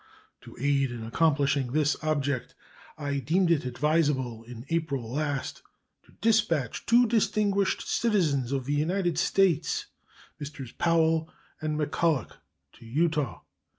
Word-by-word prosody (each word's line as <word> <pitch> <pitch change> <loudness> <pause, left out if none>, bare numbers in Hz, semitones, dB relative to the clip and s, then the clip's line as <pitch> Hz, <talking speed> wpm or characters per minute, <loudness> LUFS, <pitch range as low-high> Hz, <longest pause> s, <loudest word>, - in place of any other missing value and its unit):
To - - -13
aid 140 0 +2
in 120 -2 -6
accomplishing 140 0 +1
this 150 0 +2
object, 145 -4 -1 0.4
I 145 -2 -2
deemed 170 +7 +2
it 150 -5 +2
advisable 130 -3 0
in 120 +1 -10
April 140 -8 -2
last 145 -2 -2 0.4
to - - -22
dispatch 210 - +1
two 240 +1 +6
distinguished 210 -3 +1
citizens 160 - +1
of 135 -2 -1
the 145 - -1
United 175 +3 0
States, 195 - +2 0.5
Messrs. 140 -4 -7
Powell 165 -1 +2 0.3
and 155 -1 -2
McCulloch, 150 0 0 0.4
to - - -14
Utah. 155 +3 0
150 Hz, 120 wpm, -27 LUFS, 135-170 Hz, 0.5 s, two